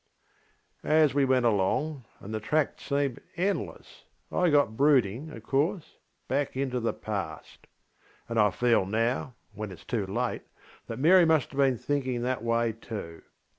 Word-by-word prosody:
ŌĆÖ - - -6
As 155 -2 +5
we 140 -1 +3
went 130 -2 +2
alongŌĆöand 115 +2 -1
the 110 - -2
track 150 +7 0
seemed 140 -3 -1 0.2
endlessŌĆöI 180 -2 -2
got 145 -7 +3
brooding, 135 -1 +2
of 115 -8 -10
course, 155 - -1 0.3
back 135 -1 -1
into 130 -2 -1
the 115 - 0
past. 100 -8 -6 0.6
And 115 -1 -1
I 105 -1 +5
feel 115 -2 +2
now, 115 +4 -1 0.2
when 105 +1 -5
itŌĆÖs 90 -4 -12
too 105 -5 -2
late, 95 - -2 0.5
that - - -5
Mary 170 +6 +6
must 160 -5 +2
have 140 - -6
been 135 -3 +3
thinking 130 -1 -2
that 125 -1 -1
way 115 0 +1
too. 105 -7 -8
125 Hz, 150 wpm, -28 LUFS, 110-145 Hz, 0.6 s, Mary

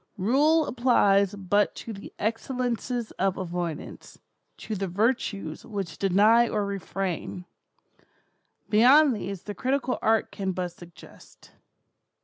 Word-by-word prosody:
Rule 290 - +3
applies 205 -6 +3
but 205 +1 +1
to 225 - -7
the 195 - -10
excellences 240 +1 -2
of 195 0 +1
avoidance—to 175 +4 -7
the 195 -1 -2
virtues 200 -4 -1
which 200 -7 -6
deny 210 +5 +4
or 210 -1 -1
refrain. 190 -2 -4 1.2
Beyond 260 +5 +5
these 195 -3 -6
the 205 - -6
critical 260 +4 -1
art 220 0 +2
can 190 -2 -3
but 180 0 -3
suggest. 175 0 -16
205 Hz, 110 wpm, -26 LUFS, 190-240 Hz, 1.2 s, Beyond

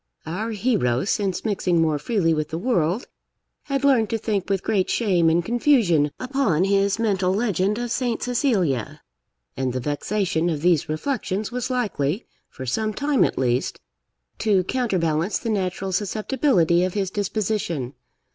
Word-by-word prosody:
Our 200 +8 -3
hero, 200 - 0
since 200 -2 -1
mixing 185 -5 +1
more 155 -2 +2
freely 170 - +1
with 155 -1 -2
the 160 - -3
world, 185 -1 0 0.6
had 275 -1 -2
learned 255 -6 +4
to 225 - 0
think 205 -4 -2
with 195 -1 0
great 190 -3 +1
shame 180 -8 +2
and 170 +1 +1
confusion 225 - +3
upon 255 - +1
his 200 +1 +2
mental 195 -5 +1
legend 200 -1 0
of 240 -1 -3
Saint 240 -1 -1
Cecilia, 200 - 0 0.5
and 130 -2 -2
the 130 - -1
vexation 170 +5 -1
of 155 -2 -3
these 170 -5 +2
reflections 205 - -2
was 250 0 -3
likely, 205 - -1 0.2
for 130 - -8
some 215 - -1
time 285 -1 +2
at - - 0
least, 125 -1 0 0.6
to 200 -4 +2
counterbalance 185 -6 0
the 230 - -3
natural 190 -1 -2
susceptibility 205 - +1
of 185 +1 -2
his 195 -2 -1
disposition. 200 - -2
195 Hz, 150 wpm, -23 LUFS, 165-225 Hz, 0.6 s, learned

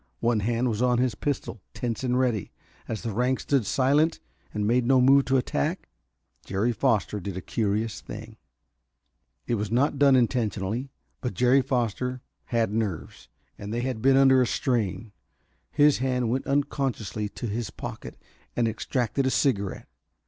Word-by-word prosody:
One 115 -1 +2
hand 115 +4 0
was 110 -1 -1
on 125 -1 +3
his 125 -1 +1
pistol, 125 -3 -3
tense 120 0 -3
and 125 -1 +1
ready. 120 -6 0 0.4
As 110 - -4
the 115 -3 -3
ranks 125 +4 0
stood 135 -8 +1
silent 145 +7 +2 0.3
and 105 -1 -2
made 120 +3 +3
no 130 +2 +4
move 135 +2 +5
to 135 0 +2
attack, 150 +6 -1 0.6
Jerry 100 +5 0
Foster 110 -3 0
did 95 -1 -5
a - - -2
curious 105 +3 -2
thing. 110 +1 -9 1.1
It - - -1
was 105 - -3
not 135 +5 +1
done 140 -2 +6
intentionally, 120 -1 0 0.3
but 125 - -3
Jerry 125 +2 +4
Foster 125 -1 -2 0.2
had 115 -3 0
nerves, 105 -7 -4 0.3
and 105 0 -6
they 120 +2 -1
had 125 -3 -3
been 135 +2 +5
under 135 -1 +6
a 125 - +2
strain. 110 -6 -1 0.6
His 145 -2 +4
hand 125 -3 0
went 130 +2 -2
unconsciously 135 -7 -1
to 120 - -7
his 115 +1 -3
pocket - - -8 0.4
and 120 -1 +2
extracted 120 +3 -1
a - - +3
cigarette. 100 -8 0
120 Hz, 160 wpm, -26 LUFS, 110-130 Hz, 1.1 s, done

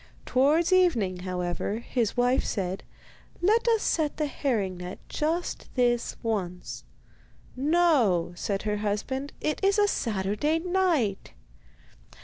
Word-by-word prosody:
Towards 305 +8 +3
evening, 235 - +3
however, 180 +2 -2
his 235 -1 -2
wife 245 +1 +3
said: 190 -2 -3 0.6
'Let 435 +7 +3
us 450 -2 +3
set 310 -3 0
the 305 - 0
herring 220 -10 -1
net 180 +1 -7
just 330 +3 -2
this 240 -2 +1
once.' 185 -6 -3 0.7
'No,' 265 - +3
said 195 +3 -2
her 210 -1 -1
husband, 215 +7 -2
'it 305 +5 -2
is 395 +1 +3
a 415 0 +4
Saturday 215 - 0
night. 335 - 0
245 Hz, 120 wpm, -27 LUFS, 195-325 Hz, 0.7 s, a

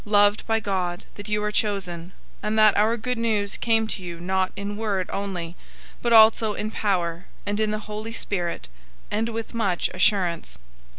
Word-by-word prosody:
"} - - -22
loved 205 0 +3
by 225 0 +2
God, 185 -4 -2
that 205 +1 -9
you 210 0 0
are 210 - 0
chosen, 195 -6 -1
001:005 175 +3 -13 0.3
and 215 +1 -1
that 215 -1 +6
our 220 +3 +3
Good 245 +1 -2
News 210 -3 0
came 225 -1 +2
to 195 - -4
you 170 -1 -6
not 185 +1 0
in 200 +1 -4
word 205 -4 -1
only, 180 -4 -4 0.5
but 235 - 0
also 220 -1 +6
in 215 +1 -3
power, 180 -5 -1 0.2
and 205 +1 -1
in 215 -1 +2
the 215 0 -3
Holy 215 +1 -5
Spirit, 175 - -3 0.4
and 225 +2 0
with 225 -1 -5
much 200 -7 0
assurance. 180 - +1
205 Hz, 185 wpm, -24 LUFS, 185-220 Hz, 0.5 s, that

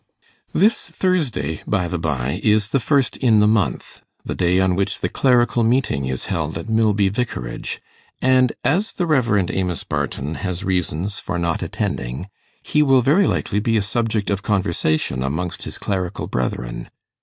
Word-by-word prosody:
This 210 +6 +2
Thursday, 140 - -1
by 95 -4 +1
the 90 -1 -3
by, 70 0 -1
is 105 0 +3
the 135 - +3
first 135 +1 +1
in 115 -5 +4
the 105 - +5
month 105 - 0 0.2
the - - -3
day 90 +1 +2
on 95 -1 +2
which 100 +2 -1
the - - 0
Clerical 120 -2 +3
Meeting 115 - +1
is 65 -1 -3
held - - -2
at - - -7
Milby 110 -3 +2
Vicarage; 100 - -3 0.4
and 130 -2 +4
as 195 +10 +1
the 180 - -1
Rev. 115 - +2
Amos 90 -3 -2
Barton 70 +3 -3
has 90 0 -3
reasons 95 0 -1
for 90 - -3
not 85 -1 -1
attending, 65 +11 -3 0.3
he 150 - +2
will 135 -3 +5
very 155 +11 +4
likely 105 - 0
be 115 +2 +1
a 105 - +1
subject 110 -1 0
of 100 0 -1
conversation 85 -9 0
amongst 80 +7 -3
his - - -4
clerical 95 -3 -3
brethren. - - -3
100 Hz, 165 wpm, -21 LUFS, 85-120 Hz, 0.4 s, the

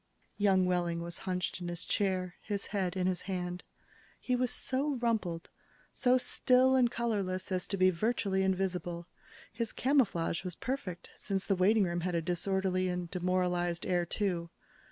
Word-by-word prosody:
Young 190 -2 +4
Wehling 175 -2 0
was 170 0 -5
hunched 180 0 -2
in 175 - -4
his 175 -1 -5
chair, 185 -3 0
his 200 -2 -3
head 190 -3 -2
in 180 - +1
his 185 -1 0
hand. 180 -2 -3 0.6
He 250 - 0
was 250 0 +1
so 275 +3 -1
rumpled, 220 -9 -1 0.4
so 255 -1 +4
still 255 +1 +3
and 250 -2 +4
colorless 200 -6 -2
as 185 -1 0
to 195 - -2
be 185 0 +5
virtually 195 0 0
invisible. 180 -3 -1 0.5
His 230 0 -2
camouflage 210 - +1
was 180 -2 -5
perfect, 205 -10 -4
since 195 -2 -3
the 200 - +2
waiting 200 +3 +4
room 175 -1 -1
had 180 0 -1
a 165 - +1
disorderly 185 +1 0
and 180 -1 -3
demoralized 180 -1 0
air, 180 -1 +2
too. 175 -4 -1
185 Hz, 160 wpm, -32 LUFS, 180-210 Hz, 0.6 s, be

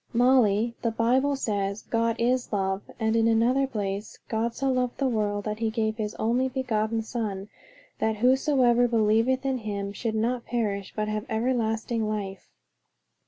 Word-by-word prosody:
"Molly, 235 -3 +3
the 230 - +1
Bible 255 +5 +2
says 205 -5 -2
'God 230 0 0
is 250 +1 0
love.' 195 -1 -1
And 220 0 +1
in 225 0 +3
another 240 +4 +3
place, 205 -3 -4
'God 230 +1 -1
so 270 -1 0
loved 250 -1 -1
the 275 - +1
world, 205 -4 -1
that 215 0 -3
he 225 -1 0
gave 220 -1 -1
his 210 -2 -3
only 245 +4 +1
begotten 225 -4 -1
Son, 210 -4 -4 0.5
that 220 0 +1
whosoever 250 0 +3
believeth 230 +3 +2
in 265 -2 0
him 200 -2 -4
should 220 +1 -3
not 235 +2 0
perish, 205 -5 -2
but 215 0 -1
have 215 0 -3
everlasting 225 -1 0
life.' 195 -3 -5
225 Hz, 160 wpm, -26 LUFS, 215-245 Hz, 0.5 s, Molly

